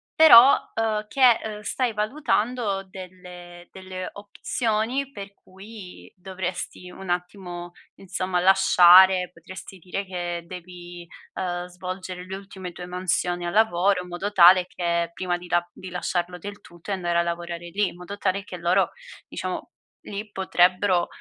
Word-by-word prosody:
però, 270 Hz, -4 st, +9 dB, 0.2 s
uhm, 215 Hz, -1 st, -1 dB
che, 255 Hz, -2 st, +4 dB
uhm, 210 Hz, -1 st, -6 dB
stai 245 Hz, +2 st, -1 dB
valutando 215 Hz, -3 st, -1 dB
delle 180 Hz, -2 st, -11 dB
delle 185 Hz, -1 st, -7 dB
opzioni 225 Hz, +5 st, -2 dB
per 200 Hz, -3 st, -9 dB
cui 195 Hz, 0 st, -13 dB
dovresti 185 Hz, -1 st, -6 dB
un 190 Hz, 0 st, -10 dB
attimo, 175 Hz, -1 st, -4 dB, 0.2 s
insomma, 185 Hz, -1 st, -3 dB
lasciare 185 Hz, -1 st, +6 dB
potresti 185 Hz, +3 st, -11 dB
dire 185 Hz, +3 st, -5 dB
che 175 Hz, -2 st, -4 dB
devi, 175 Hz, -1 st, -10 dB, 0.3 s
uhm, 175 Hz, -1 st, -3 dB
svolgere 180 Hz, 0 st, -7 dB
le 190 Hz, +1 st, -6 dB
ultime 190 Hz, -2 st, -9 dB
tue 180 Hz, -, -8 dB
mansioni 180 Hz, -1 st, -2 dB
al -, -, -4 dB
lavoro, 195 Hz, -3 st, +3 dB
in 180 Hz, -, -11 dB
modo 185 Hz, +4 st, -4 dB
tale 180 Hz, 0 st, +7 dB
che, 170 Hz, -2 st, -1 dB
prima 175 Hz, +1 st, -2 dB
di 175 Hz, 0 st, -12 dB
la 175 Hz, 0 st, +1 dB
di 185 Hz, -, -10 dB
lasciarlo 180 Hz, 0 st, -3 dB
del 205 Hz, +3 st, -9 dB
tutto 175 Hz, +1 st, -11 dB
e -, -, +1 dB
andare 175 Hz, -2 st, 0 dB
a -, -, +4 dB
lavorare 170 Hz, 0 st, -5 dB
lì, 200 Hz, +3 st, 0 dB
in -, -, -8 dB
modo 180 Hz, +3 st, -9 dB
tale 200 Hz, 0 st, -1 dB
che 185 Hz, -3 st, -9 dB
loro, 175 Hz, +2 st, +2 dB, 0.4 s
diciamo, -, -, -5 dB, 0.3 s
lì 205 Hz, +1 st, -7 dB
potrebbero, 185 Hz, -1 st, +2 dB
185 Hz, 145 wpm, -24 LUFS, 175-200 Hz, 0.4 s, però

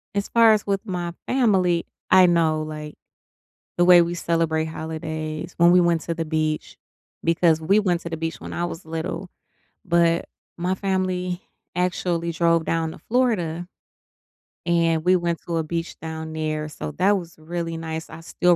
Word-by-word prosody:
as 200 Hz, -, 0 dB
far 230 Hz, -2 st, +6 dB
as 210 Hz, -, 0 dB
with 200 Hz, +2 st, -1 dB
my 175 Hz, -4 st, -3 dB
family, 190 Hz, -9 st, +2 dB, 0.2 s
I 185 Hz, -1 st, +7 dB
know, 160 Hz, -3 st, +2 dB
like, 150 Hz, -1 st, -7 dB, 0.8 s
the 175 Hz, -, +4 dB
way 175 Hz, -1 st, +8 dB
we 170 Hz, +1 st, -2 dB
celebrate 165 Hz, -2 st, 0 dB
holidays 160 Hz, +1 st, -5 dB
when 170 Hz, 0 st, +6 dB
we 180 Hz, -, +6 dB
went 170 Hz, -2 st, +2 dB
to 170 Hz, -, -3 dB
the 165 Hz, 0 st, -2 dB
beach 155 Hz, -1 st, -2 dB, 0.5 s
because 165 Hz, -1 st, +3 dB
we 195 Hz, +6 st, +3 dB
went 180 Hz, -4 st, +1 dB
to 170 Hz, -, -6 dB
the 165 Hz, -, -3 dB
beach 165 Hz, 0 st, -4 dB
when -, -, -8 dB
I 175 Hz, -, -2 dB
was 165 Hz, -, -7 dB
little, 165 Hz, +3 st, -4 dB, 0.5 s
but 170 Hz, -1 st, +2 dB, 0.3 s
my 180 Hz, +2 st, 0 dB
family 185 Hz, -2 st, -1 dB, 0.3 s
actually 175 Hz, -1 st, 0 dB
drove 165 Hz, 0 st, +2 dB
down 165 Hz, 0 st, 0 dB
to -, -, -11 dB
Florida, 180 Hz, -9 st, 0 dB, 1.0 s
and 165 Hz, -2 st, +2 dB
we 185 Hz, +1 st, +5 dB
went 170 Hz, -2 st, -1 dB
to 170 Hz, -1 st, -1 dB
a 160 Hz, -, 0 dB
beach 165 Hz, +2 st, -4 dB
down 160 Hz, 0 st, -6 dB
there, 155 Hz, -1 st, -2 dB
so 150 Hz, -, -6 dB
that 195 Hz, +6 st, +3 dB
was 170 Hz, -3 st, -8 dB
really 165 Hz, +1 st, -4 dB
nice. 160 Hz, 0 st, -5 dB
I -, -, -9 dB
still 175 Hz, +1 st, +2 dB
170 Hz, 170 wpm, -23 LUFS, 160-180 Hz, 1.0 s, way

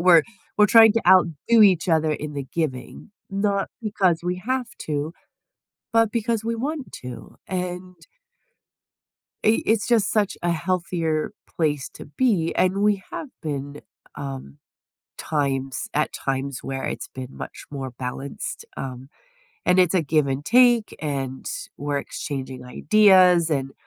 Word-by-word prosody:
We're 175 Hz, -2 st, +7 dB, 0.3 s
we're 210 Hz, -, +6 dB
trying 225 Hz, 0 st, +8 dB
to 230 Hz, -, +1 dB
outdo 185 Hz, +4 st, +4 dB
each 185 Hz, -4 st, +4 dB
other 160 Hz, -1 st, +3 dB
in 150 Hz, 0 st, -5 dB
the 140 Hz, -1 st, -4 dB
giving, 150 Hz, -, -4 dB, 0.2 s
not 200 Hz, 0 st, 0 dB
because 190 Hz, -6 st, +1 dB
we 180 Hz, +1 st, -1 dB
have 260 Hz, -1 st, 0 dB, 0.2 s
to, 150 Hz, +1 st, -2 dB, 0.8 s
but 225 Hz, -1 st, +3 dB
because 230 Hz, -1 st, -1 dB
we 230 Hz, 0 st, -1 dB
want 280 Hz, +3 st, -4 dB
to, 120 Hz, -3 st, -9 dB
and 180 Hz, 0 st, -4 dB, 1.5 s
i 220 Hz, +1 st, +4 dB
it's 220 Hz, -1 st, +2 dB
just 235 Hz, -4 st, +3 dB
such 210 Hz, -3 st, +1 dB
a 175 Hz, -, +1 dB
healthier 170 Hz, -2 st, -1 dB, 0.2 s
place 150 Hz, -4 st, -1 dB
to -, -, -11 dB
be, 170 Hz, -, +1 dB
and 190 Hz, +2 st, +2 dB
we 205 Hz, -2 st, +2 dB
have 300 Hz, -, -5 dB
been, 145 Hz, -2 st, -5 dB, 0.3 s
um, 135 Hz, -, -7 dB, 0.6 s
times 135 Hz, -3 st, -2 dB
at 150 Hz, +1 st, +1 dB
times 135 Hz, 0 st, -3 dB
where 135 Hz, 0 st, -4 dB
it's -, -, -4 dB
been 130 Hz, -1 st, -7 dB
much -, -, -8 dB
more 135 Hz, -2 st, -5 dB
balanced, 130 Hz, +2 st, -5 dB
um, 130 Hz, 0 st, -6 dB, 0.6 s
and 180 Hz, +1 st, +4 dB
it's 180 Hz, -1 st, +4 dB
a 180 Hz, -, +3 dB
give 150 Hz, -1 st, +2 dB
and 135 Hz, +2 st, -2 dB
take, 240 Hz, +2 st, +4 dB
and 135 Hz, -3 st, -4 dB, 0.3 s
we're 145 Hz, 0 st, -2 dB
exchanging 135 Hz, -3 st, -6 dB
ideas, 180 Hz, +3 st, +5 dB
and, 135 Hz, -2 st, -1 dB
165 Hz, 140 wpm, -23 LUFS, 140-205 Hz, 1.5 s, trying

